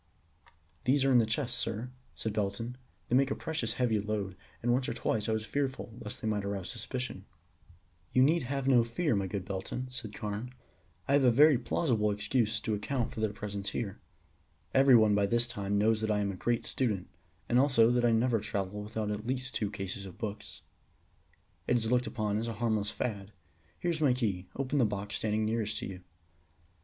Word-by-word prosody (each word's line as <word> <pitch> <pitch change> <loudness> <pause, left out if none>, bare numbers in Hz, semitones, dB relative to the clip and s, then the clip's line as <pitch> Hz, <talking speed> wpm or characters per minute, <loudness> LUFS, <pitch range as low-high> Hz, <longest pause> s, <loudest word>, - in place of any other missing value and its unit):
"They 135 +2 +4
are 135 - +4
in 125 - +7
these 110 - +2
chests, 120 +2 -1
sir," 115 +3 -2 0.2
said 110 - -3
Belton. 105 +4 -2 0.3
"They 125 - +2
make 135 +1 +4
a - - -1
precious 160 0 -2
heavy 115 -4 +1
load, 100 -2 -2 0.3
and 120 0 +3
once 130 +1 +1
or - - -3
twice 110 -1 -1
I - - +2
was 110 0 -1
fearful 130 -3 -2
lest 105 -2 -7
they - - -1
might 105 -2 0
arouse 100 -1 -3
suspicion." 125 -3 -5 0.9
"You 130 - +5
need 160 +5 +4
have 135 +1 -2
no 125 -3 +6
fear, 120 +4 0
my 100 -1 0
good 95 0 -4
Belton," 100 +7 -4
said 120 -4 -5
Carne. 105 +4 -4 0.5
"I 140 - +2
have 140 -1 +5
a 125 - +7
very 140 +2 +6
plausible 115 -3 +1
excuse 105 +2 +1
to 110 - -1
account 115 +4 -1
for - - -6
their 110 -1 +1
presence 100 -1 -4
here. 105 -5 -3 0.7
Everyone 120 -6 +6
by 100 -1 +3
this 120 +3 +3
time 100 -3 -2
knows 110 +1 +3
that 110 - -1
I 105 -1 +2
am 100 -1 0
a - - -6
great 120 +5 0
student, 105 -8 -1 0.4
and 120 - +4
also 130 -4 +5
that 120 0 +2
I 120 - +4
never 115 0 +3
travel 100 -1 -3
without 105 0 -3
at 105 +2 -4
least 130 -1 -2
two 105 -2 -1
cases 100 -1 -5
of 90 - -11
books. 105 -2 -6 1.0
It 125 - +4
is 115 0 -1
looked 125 0 +2
upon 105 -2 -1
as 115 - -2
a 115 - -2
harmless 110 -2 0
fad. 105 -2 -4 0.5
Here 175 - 0
is 160 -2 -3
my 140 -5 +5
key. 100 -8 -1
Open 135 +1 0
the - - +5
box 100 -1 -3
standing 110 0 0
nearest 110 -1 -1
to - - -3
you." 95 -2 -7
110 Hz, 205 wpm, -31 LUFS, 105-125 Hz, 1.0 s, in